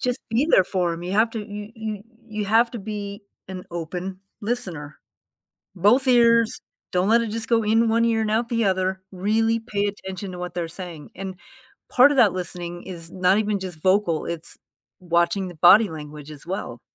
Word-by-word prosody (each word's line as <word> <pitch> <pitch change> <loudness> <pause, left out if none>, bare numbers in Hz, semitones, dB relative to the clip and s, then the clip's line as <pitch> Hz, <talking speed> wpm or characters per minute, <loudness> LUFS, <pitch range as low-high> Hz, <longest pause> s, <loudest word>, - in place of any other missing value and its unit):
just 250 -1 0
be 250 +7 +2
there 185 - +6
for 180 -3 0
'em, 165 - -6
you 180 +2 -4
have 220 +2 +3
to 225 - -4
you 205 0 -7
you 215 -2 -5 0.3
you 210 -1 -3
have 230 +3 +4
to 235 - -5
be 205 0 -6 0.3
an 185 -1 -7
open 180 +3 -5 0.2
listener, 185 - -4 0.8
both 230 +9 +4
ears, 230 -2 +4 0.3
don't 180 +2 +1
let 230 +1 +5
it 230 - -2
just 225 +1 -1
go 230 -1 +2
in 225 +2 +3
one 230 +1 +3
ear 225 -1 +1
and 215 - -1
out 230 +2 0
the 230 -1 +1
other, 190 -1 0
really 220 +4 +1
pay 210 -3 -2
attention 190 -1 -6
to 180 - -8
what 180 -1 -5
they're 175 -2 -3
saying, 165 -3 -8
and 190 0 -6 0.5
part 255 +3 +6
of 285 - -1
that 210 -7 +5
listening 175 -1 -4
is 170 -2 -6
not 185 +1 +2
even 210 -1 0
just 180 -4 -7
vocal, 185 -3 +2
it's 170 -1 -2 0.4
watching 175 +2 +1
the 175 - -9
body 195 +6 +7
language 150 -1 -9
as 145 -2 -10
well. 170 - -5
195 Hz, 195 wpm, -23 LUFS, 175-225 Hz, 0.8 s, body